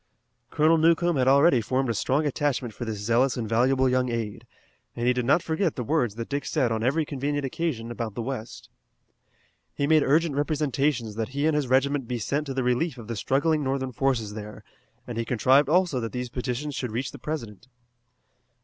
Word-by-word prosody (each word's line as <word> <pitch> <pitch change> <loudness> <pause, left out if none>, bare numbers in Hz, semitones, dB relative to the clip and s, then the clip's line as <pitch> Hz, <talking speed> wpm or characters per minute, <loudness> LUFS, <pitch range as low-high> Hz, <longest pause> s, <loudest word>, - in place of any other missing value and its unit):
Colonel 160 +3 +3
Newcomb 170 +1 +3
had 130 -1 +2
already 140 -1 +5
formed 130 +4 -1
a - - 0
strong 135 +7 0
attachment 140 -4 -1
for 120 - -6
this 110 -2 -4
zealous 120 +6 +1
and 115 -2 -3
valuable 130 +4 +2
young 125 0 +1
aide, 115 -3 -4 0.5
and 120 - -2
he 125 - +4
did 125 -1 -2
not 140 +7 +3
forget 165 +1 0
the 125 - -3
words 120 -5 0
that 115 0 -5
Dick 140 0 -2
said 130 -7 0
on 110 -1 -1
every 140 +7 +1
convenient 145 0 -2
occasion 130 -5 -3
about 115 -3 -5
the 120 - -3
west. 120 -3 -6 1.1
He 140 - 0
made 155 +1 +4
urgent 155 +3 +2
representations 145 -5 0
that 115 0 -2
he 145 - +1
and 160 -1 +2
his 150 -3 0
regiment 135 0 +1
be 125 0 -2
sent 140 +7 -2
to 135 - -3
the 130 - 0
relief 125 +4 0
of 115 -3 -10
the 115 - -2
struggling 145 - +1
Northern 130 -1 -2
forces 120 -5 -1
there, 105 0 -8 0.4
and 120 -2 -5
he - - 0
contrived 135 +4 +3
also 175 -5 +2
that 115 -1 -4
these 125 -1 -4
petitions 125 +4 -3
should 125 -2 -3
reach 125 +4 -3
the 145 - -11
President. 120 -7 -6
130 Hz, 205 wpm, -26 LUFS, 120-145 Hz, 1.1 s, already